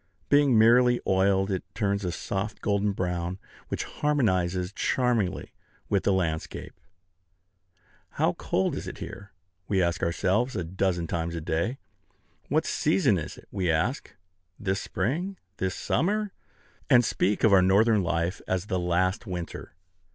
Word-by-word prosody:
Being 145 -4 +5
merely 120 +2 +5
oiled, 95 +1 +2
it 95 - -1
turns 100 -2 0
a 90 - -1
soft 100 +4 -4
golden 100 0 +1
brown, 90 -1 -2 0.3
which - - -3
harmonizes 95 -11 0
charmingly 120 -7 0 0.4
with 100 -2 +1
the - - +4
landscape. 80 -4 -2 1.4
How - - +2
cold 95 - -1
is - - -5
it - - -6
here? 100 -1 -9 0.4
We 95 - +1
ask 85 -2 +1
ourselves, 100 +9 +1
a 90 - -1
dozen 90 0 -1
times 85 0 -3
a - - -2
day, 85 - -1 0.7
"What - - +2
season 95 0 +2
is 75 - -7
it?" - - -15
We 95 -3 -1
say, 85 +10 +2 0.7
"This 95 -1 -1
spring," 160 - -2 0.2
"This 95 0 -1
summer," 205 - 0 0.6
and 125 -4 +6
speak 105 0 0
of 110 -3 +6
our 95 - +7
Northern 105 +3 +4
life 85 +2 -1
as 95 +2 -2
"last 90 +4 0
winter." 90 -3 -6
95 Hz, 140 wpm, -27 LUFS, 90-110 Hz, 1.4 s, our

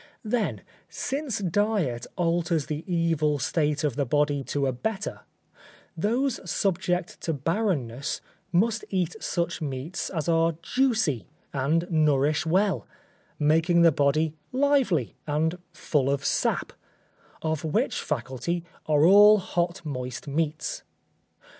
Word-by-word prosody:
Then, 220 0 -1 0.3
since 280 -3 -3
diet 195 - 0
alters 170 -3 +1
the 155 +1 -4
evil 165 -3 +1
state 150 +2 0
of 145 -5 0
the 145 - +2
body 145 +1 +1
to 140 -1 -1
a 135 - +1
better, 205 - -3 0.8
those 235 +9 0
subject 180 -1 -1
to 165 - -1
barrenness 145 - -1 0.3
must 220 +6 +2
eat 185 0 -1
such 170 -4 -2
meats 140 +4 -4
as 160 -5 -3
are 165 -1 +3
juicy 220 - +1 0.3
and 150 +5 +1
nourish 150 0 +2
well, 190 +4 +1 0.5
making 165 +3 +3
the 165 - +7
body 150 +2 +2 0.2
lively 255 - +2
and 160 +4 0
full 145 -4 0
of 140 0 -1
sap; - - 0 0.7
of 160 -1 -1
which 155 -1 0
faculty 145 +5 -3 0.2
are 150 0 +4
all 205 +3 +8
hot 175 -2 -2
moist 125 -2 -5
meats. 155 +1 -2
165 Hz, 120 wpm, -26 LUFS, 145-185 Hz, 0.8 s, all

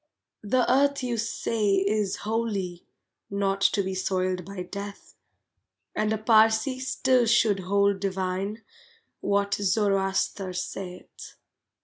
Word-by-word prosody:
The 245 +4 +1
earth 280 +1 +3
you 245 -1 -1
say 220 -2 0
is 200 0 +1
holy, 205 -6 -2 0.4
Not 195 0 -1
to 200 0 +3
be 190 0 -3
soiled 185 -1 -1
by 190 +1 -6
death, 200 +2 -8 0.8
And 215 0 0
a 220 - +1
Parsee 220 +3 +3
still 260 -2 +2
should 220 -3 +3
hold 200 +1 +1
divine 195 +2 -2 0.6
What 200 0 0
Zoroaster 195 -1 0
saith. 180 0 -7
200 Hz, 110 wpm, -26 LUFS, 190-220 Hz, 0.8 s, earth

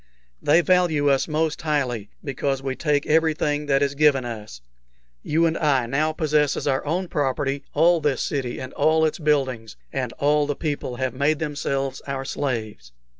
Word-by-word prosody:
They 160 +4 +4
value 165 -4 +3
us 135 - +1
most 155 0 -1
highly, 130 -9 -1
because 135 -1 -2
we 135 -1 -2
take 145 -2 0
everything 150 -2 +1
that 135 0 +3
is 140 0 0
given 140 -3 +3
us. 105 - -7 0.6
You 165 +2 +1
and 165 0 +1
I 140 -6 +2
now 150 +6 0
possess 150 -2 +1
as - - -4
our 135 -2 0
own 180 +4 -1
property 140 -1 -1
all 165 +2 +4
this 145 -2 0
city 130 -4 -3
and 130 0 -7
all 160 0 +3
its 155 - -1
buildings, 135 -8 0 0.2
and 130 -4 -2
all 145 +1 +2
the 145 - -1
people 145 -5 -3
have 130 0 -2
made 140 +4 +1
themselves 140 -3 -2
our 135 -1 -3
slaves." 110 - -4
145 Hz, 175 wpm, -23 LUFS, 135-155 Hz, 0.6 s, They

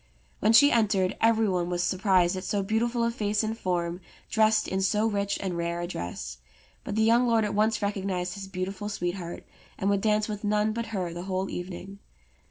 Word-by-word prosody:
When 215 - +3
she 285 +5 +7
entered 205 -5 +2
every 225 -1 +4
one 180 -2 0
was 175 0 -1
surprised 185 -1 +2
at 185 - -5
so 200 -1 -1
beautiful 235 +4 0
a 230 - +1
face 210 -2 0
and 220 +1 -2
form 175 -3 -2 0.3
dressed 220 0 +3
in 190 0 -1
so 210 +3 +2
rich 200 -2 0
and 185 -3 -3
rare 170 0 -2
a 175 - -2
dress; 75 - -6 0.4
but 205 - -4
the 220 - +3
young 235 +2 +4
lord 225 -2 +3
at 210 - -2
once 210 +1 +1
recognized 190 -3 -2
his 195 0 -7
beautiful 195 +2 -4
sweetheart, 175 -3 -4 0.3
and 195 +1 +1
would 200 -1 +1
dance 215 0 +2
with 210 -1 -5
none 210 +1 +1
but 230 0 -3
her 185 -6 -3
the 175 +1 -6
whole 190 0 -2
evening. 185 +2 -7
200 Hz, 200 wpm, -27 LUFS, 180-215 Hz, 0.4 s, she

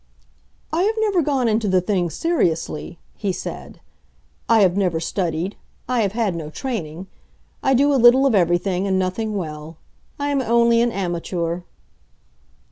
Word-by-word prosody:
"I 330 - +2
have 430 +4 +1
never 415 -5 +2
gone 275 -5 +1
into 220 -1 +1
the 185 -1 +3
thing 180 -1 0
seriously," 170 - -1 0.2
he 200 -3 -2
said. - - -7 0.7
"I 225 -2 +5
have 185 -2 +4
never 180 -5 +1
studied; 170 +1 -2 0.3
I 250 -1 +1
have 200 -2 0
had 220 -5 0
no 160 -2 -5
training. 180 - -5 0.6
I 270 - +2
do 285 +3 +3
a 265 - +2
little 245 +3 +7
of 270 - +3
everything, 180 +1 +1
and 190 -1 +1
nothing 190 +4 -2
well. 155 -3 -6 0.4
I 285 0 -2
am 280 -1 +1
only 235 -1 +3
an 240 0 +2
amateur." 175 -2 -3
200 Hz, 155 wpm, -21 LUFS, 175-240 Hz, 0.7 s, little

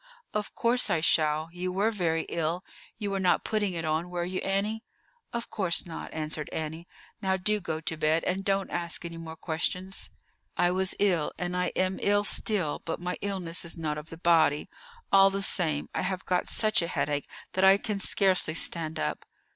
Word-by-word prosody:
"Of 210 -1 -3
course 240 -1 +2
I 170 -4 +2
shall; 155 0 +2
you 180 +1 -3
were 200 +5 +1
very 165 -6 0
ill. 170 +2 -2 0.3
You 205 -2 -3
were 195 - -1
not 185 -2 +2
putting 210 -3 0
it 165 0 -3
on, 160 +3 -1
were 175 -1 -2
you, 185 +1 -3
Annie?" 210 +3 -1 0.5
"Of 235 0 -4
course 185 -5 +2
not," 165 -2 -7
answered 155 -1 -3
Annie. 160 +2 -5 0.3
"Now, 190 -1 +1
do 210 +3 +1
go 160 -4 -3
to 160 0 -2
bed, 155 +1 +2
and 190 +2 -1
don't 195 0 0
ask 170 0 -1
any 170 0 -6
more 160 -1 -7
questions. 180 +4 -3 0.5
I 175 - +3
was 190 +1 0
ill, 180 -7 +2
and 180 0 -3
I 180 0 +1
am 185 0 0
ill 205 0 +3
still, 200 -6 +2
but 165 - -3
my 180 +1 -3
illness 185 -4 0
is 170 0 -4
not 150 -2 -2
of 155 +2 -12
the 165 - -9
body. 160 -3 +3 0.4
All 195 0 +7
the 195 0 -2
same, 155 -7 +2
I - - -1
have 185 0 -2
got 180 -1 0
such 215 -2 +2
a 170 - -1
headache 145 -3 -1 0.2
that 190 - +1
I 190 +1 +8
can 205 0 -3
scarcely 190 -5 +2
stand 160 -2 +1
up." 75 0 -2
180 Hz, 195 wpm, -28 LUFS, 160-195 Hz, 0.5 s, I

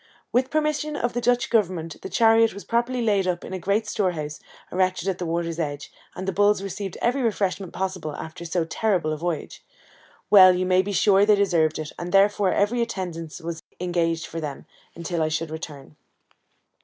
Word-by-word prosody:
With 255 +2 +2
permission 305 -1 -1
of 240 -4 -1
the 245 - -2
Dutch 245 0 +1
governor 185 -8 +1
the 160 - -9
chariot 225 -2 +4
was 200 - -8
properly 240 +1 0
laid 200 -4 +2
up 175 -1 -2
in - - -7
a 185 - -3
great 200 +5 0
storehouse, 170 -8 -2 0.3
erected 185 -1 0
at 190 -2 -1
the 175 - -3
water's 170 0 -2
edge, 145 -3 -4 0.2
and 190 +1 -6
the - - +1
bulls 205 +1 +2
received 195 -1 -5
every 250 +3 +2
refreshment 195 -5 -1
possible 185 -5 -4
after 160 +1 -8
so 170 0 -1
terrible 175 -3 0
a - - -4
voyage. 170 -2 -4 0.7
Well, 185 -3 +9
you 185 +1 0
may 185 0 +4
be 200 +2 -4
sure 200 0 +4
they 210 0 +5
deserved 170 -6 +2
it, 155 -1 -5
and 175 0 -5
therefore 200 0 +4
every 230 +4 +1
attendance 175 -8 -4
was 165 0 -5 0.2
engaged 170 -2 0
for 165 - -6
them, 145 -3 -6 0.3
until 170 0 -3
I 155 - +2
should 155 0 -2
return. 150 -2 -8
185 Hz, 190 wpm, -24 LUFS, 165-210 Hz, 0.7 s, Well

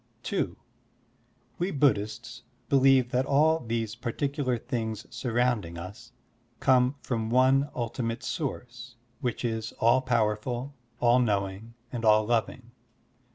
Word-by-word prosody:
(2) - - -2 1.0
We 175 +2 0
Buddhists 120 - 0 0.3
believe 135 -2 +4
that 130 +2 +1
all 155 +3 +4
these 115 -4 -3
par 120 +1 -4
ticular 140 -4 -1
things 110 -4 -4
surrounding 120 -8 0
us 100 +8 -9 0.5
come 130 +1 +3
from 115 -3 -2
one 130 +3 +4
ultimate 115 -1 -3
source 125 -5 -5 0.2
which 120 0 -2
is 110 -1 -3
all 120 +3 +3
powerful, 120 +2 -1 0.3
all 120 +1 +4
knowing, 105 0 -1 0.2
and 120 -2 -4
all 110 -1 +5
loving. 120 +1 -1
120 Hz, 115 wpm, -28 LUFS, 110-130 Hz, 1.0 s, all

